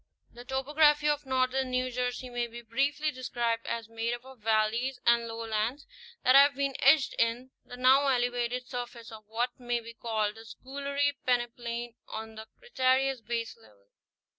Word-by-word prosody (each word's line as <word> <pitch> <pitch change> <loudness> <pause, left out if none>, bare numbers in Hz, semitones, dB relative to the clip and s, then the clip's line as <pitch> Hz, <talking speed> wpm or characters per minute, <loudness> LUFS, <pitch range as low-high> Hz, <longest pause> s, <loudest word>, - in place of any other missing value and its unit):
* - - -37
The 245 +1 -11
topography 295 +3 +3
of 295 -1 -1
northern 260 0 +1
New 255 0 0
Jersey 250 +1 -2
may 240 -1 -2
be 235 +1 -10
briefly 280 +6 0
de 255 -2 -11
scribed 230 -2 -1
as 230 -2 -3
made 230 +1 -2
up 240 +1 -14
of 265 -2 -13
valleys 220 +4 +1
and 235 0 +4
lowlands 225 +3 -2 0.4
that 255 - +5
have 280 +1 +7
been 275 0 -1
etched 275 0 +5
in 235 +3 0
the 245 - -11
now 265 +3 +5
elevated 245 -1 0
surface 245 -2 -7
of 215 -1 -12
what 240 +4 -2
may 240 -1 -1
be 230 0 -10
called 220 -2 -2
the - - -10
Schooley 280 +4 -2
peneplain 240 -1 -1
on 220 0 -7
the 220 0 -10
Cretaceous 265 - +1
baselevel. 110 - -6
245 Hz, 165 wpm, -29 LUFS, 230-265 Hz, 0.4 s, have